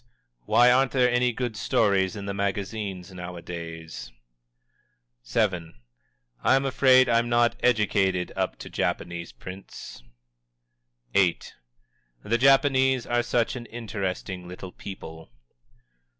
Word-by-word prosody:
"Why 125 +1 +6
aren't 130 +1 +3
there 125 -2 +3
any 125 0 +2
good 120 -1 -3
stories 100 -1 +1
in 100 -1 -6
the 100 - -3
magazines, 100 -1 -3
nowadays?" 85 -6 -8 1.2
VII. 90 - 0 0.7
"I'm 135 +1 +3
afraid 130 -1 +5
I'm 115 0 +2
not 120 0 +3
educated 95 -6 +2
up - - -1
to - - -10
Japanese 85 -1 -3
prints." 95 -8 -10 1.1
VIII. 95 -4 +3 0.9
"_The 115 +3 +1
Japanese 130 -1 +4
are 120 0 +1
such 120 0 0
an 120 -2 -7
interesting 95 -5 -5
little 90 +1 -8
people! 80 -6 -10
100 Hz, 105 wpm, -26 LUFS, 90-120 Hz, 1.2 s, Why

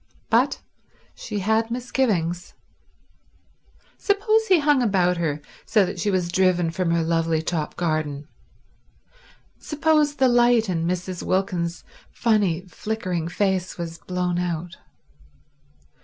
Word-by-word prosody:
But—she 210 - -3
had 220 +3 +1
misgivings. 215 -9 -1 1.4
Suppose 435 +2 +2
he 375 - +5
hung 295 -3 +3
about 185 -6 +2
her 150 -3 -2 0.2
so 210 -4 +3
that 185 0 -5
she 205 - 0
was 185 -3 0
driven 180 -2 +2
from 180 +1 -1
her 170 0 +2
lovely 165 -1 0
top 160 -2 -3
garden; 155 -4 -2 1.3
suppose 300 -1 +1
the 265 -2 +3
light 240 -3 +4
in 165 -2 -1
Mrs. 180 0 -3
Wilkins's 180 -3 -1 0.3
funny, 205 -7 +1
flickering 185 -4 -3
face 185 0 -1
was 165 -1 -6
blown 180 0 -2
out. 175 0 -3
185 Hz, 110 wpm, -23 LUFS, 170-225 Hz, 1.4 s, he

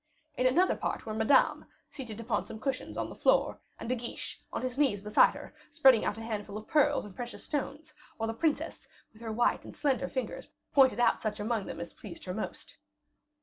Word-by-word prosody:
In 255 - +3
another 355 +9 +3
part - - -3
were 220 - -4
Madame, 220 +5 +3 0.2
seated 230 -6 -7
upon 230 -2 -1
some 220 - -8
cushions 260 +2 -3
on - - -1
the - - -8
floor, - - +3 0.2
and - - -6
De 250 - +1
Guiche, 240 -1 -5
on - - -3
his 255 +1 -3
knees 265 -9 +3
beside 210 0 +5
her, - - -9 0.2
spreading 260 -4 +5
out 210 - -1
a 225 - -6
handful 210 -2 -4
of 215 - -8
pearls 290 -4 +3
and 200 -3 -11
precious 245 -1 -6
stones, 300 +1 -4 0.2
while 225 - -1
the 225 - -2
princess, 300 +6 -1 0.3
with 220 - -18
her 225 -1 -4
white 240 +2 +2
and - - -11
slender 270 -2 +1
fingers 260 -2 -4 0.2
pointed 260 -5 +5
out 240 - +3
such 215 -1 -2
among 215 -1 -1
them - - -6
as 170 - -6
pleased 180 -5 -10
her 180 - -3
the 215 - -2
most. - - -7
235 Hz, 215 wpm, -30 LUFS, 215-270 Hz, 0.3 s, beside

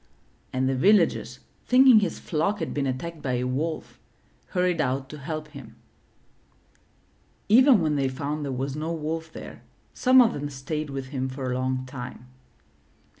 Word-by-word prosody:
'' - - -37
and 130 0 0
the 135 - +1
villagers, 200 +10 +2 0.3
thinking 255 -2 +7
his 195 -5 -2
flock 175 +6 -1
had - - -4
been 140 -2 -1
attacked 155 +5 -4
by 130 -3 -2
a 125 0 0
wolf, 145 +6 -3 0.5
hurried 180 -3 0
out 135 -1 -1
to 150 +2 -10
help 155 +1 -5
him. 140 -6 -12 1.7
Even 250 +1 +7
when 155 -2 +1
they 135 -1 +1
found 145 +3 -4
there 140 - -3
was 135 +2 -3
no 155 +2 -3
wolf 160 0 -4
there, - - -10 0.3
some 260 +1 +5
of 240 -3 +5
them 145 0 -4
stayed 145 +2 -4
with 135 -1 -5
him 130 -2 -3
for 130 -1 -4
a - - -1
long 130 0 -1
time. 125 -1 -8
145 Hz, 170 wpm, -25 LUFS, 130-165 Hz, 1.7 s, thinking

